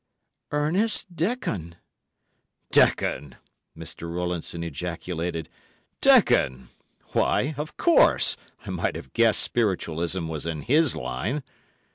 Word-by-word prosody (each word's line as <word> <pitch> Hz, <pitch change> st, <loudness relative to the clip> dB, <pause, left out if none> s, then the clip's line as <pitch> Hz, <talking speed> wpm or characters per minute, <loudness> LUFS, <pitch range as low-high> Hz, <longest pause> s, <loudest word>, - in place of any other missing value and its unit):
"Ernest 175 Hz, +6 st, +1 dB
Dekon!" 155 Hz, -, -2 dB, 1.0 s
"Dekon!" 70 Hz, -3 st, +2 dB, 0.4 s
Mr. 85 Hz, 0 st, -7 dB
Rowlandson 85 Hz, -1 st, -3 dB
ejaculated. 85 Hz, 0 st, -4 dB, 0.5 s
"Dekon! 65 Hz, -1 st, +4 dB, 0.4 s
Why, 145 Hz, +4 st, +1 dB
of 150 Hz, +2 st, -6 dB
course, 340 Hz, -, +4 dB, 0.3 s
I -, -, -5 dB
might -, -, -2 dB
have -, -, -9 dB
guessed 115 Hz, -3 st, +4 dB
Spiritualism 90 Hz, -5 st, -1 dB
was 80 Hz, 0 st, -4 dB
in 80 Hz, -3 st, -3 dB
his 150 Hz, -, +3 dB
line. 105 Hz, -, -3 dB
90 Hz, 95 wpm, -25 LUFS, -, 1.0 s, Dekon